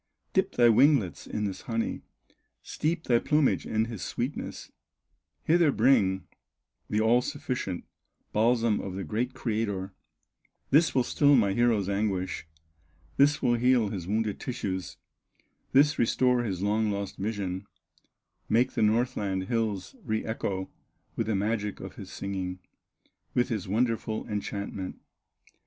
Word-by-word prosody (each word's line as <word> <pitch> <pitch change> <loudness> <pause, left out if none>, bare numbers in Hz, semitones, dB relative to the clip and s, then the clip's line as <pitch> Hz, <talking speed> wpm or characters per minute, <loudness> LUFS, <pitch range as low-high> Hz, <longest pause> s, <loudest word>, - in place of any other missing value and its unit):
Dip - - +1
thy 120 -1 +5
winglets 115 - +3
in 105 - -3
this 95 -2 -4
honey, 115 -1 -2 0.6
Steep 160 +2 -2
thy 120 -2 +3
plumage 150 0 +2
in 110 0 +1
His 115 -5 -7
sweetness, 125 +7 -4 0.7
Hither 165 -2 +4
bring 95 -10 +3 0.6
the 105 - +1
all 115 +3 +4
sufficient 125 - -3 0.5
Balsam 115 0 +3
of 95 -2 -5
the 95 - -3
great 120 +6 -2
Creator; 100 -4 -2 0.8
This 155 +4 +4
will 130 - +4
still 145 +3 +4
my 100 -6 +3
hero's 115 -4 +2
anguish, 95 -5 -1 0.7
This 145 +1 +4
will 120 - +4
heal 120 -2 +3
his 95 -4 -5
wounded 105 0 -1
tissues, 95 -7 -4 0.7
This 145 +2 +4
restore 125 +1 +3
his 95 -5 -3
long 105 +1 +1
lost 100 -1 -3
vision, 100 -2 -3 0.8
Make 120 +4 +3
the - - -2
Northland 105 -4 +1
hills 110 -6 -1
re 110 -2 -2
echo 95 -4 -3 0.4
With - - -1
the 110 - +1
magic 105 0 -1
of 95 -1 -9
his 95 -2 -9
singing, 95 -2 -4 0.8
With 125 - +2
his 105 -6 -3
wonderful 110 +1 -1
enchantment." 100 -2 -4
110 Hz, 130 wpm, -28 LUFS, 100-120 Hz, 0.8 s, thy